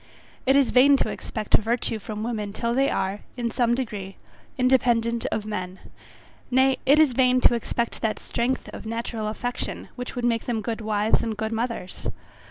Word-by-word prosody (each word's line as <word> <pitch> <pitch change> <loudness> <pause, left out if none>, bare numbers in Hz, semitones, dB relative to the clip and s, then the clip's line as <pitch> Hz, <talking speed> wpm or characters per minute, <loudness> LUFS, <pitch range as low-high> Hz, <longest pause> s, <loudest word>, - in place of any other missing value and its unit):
It 270 - +5
is 280 -2 +4
vain 275 +2 +6
to - - 0
expect 215 -2 -5
virtue 225 0 -1
from 215 +1 -5
women 215 -3 -3
till 235 +2 -1
they 270 +2 +3
are, 190 +2 -1 0.2
in 235 -1 -1
some 240 0 +2
degree, 205 -6 -5 0.4
independent 240 -3 +2
of 215 - -2
men; 185 -3 -4 0.7
nay, 260 +1 +3
it 285 +3 +7
is 305 -5 +5
vain 255 0 +4
to - - +6
expect 235 0 -2
that 220 -1 0
strength 245 +2 -2
of - - -8
natural 230 -1 -3
affection, 245 +3 -4
which 250 0 -6
would 245 -1 -2
make 230 -2 0
them 225 -3 -1
good 225 +1 -3
wives 215 0 +2
and 220 -2 -3
good 220 +1 -2
mothers. 230 -5 -3
235 Hz, 180 wpm, -25 LUFS, 215-250 Hz, 0.7 s, it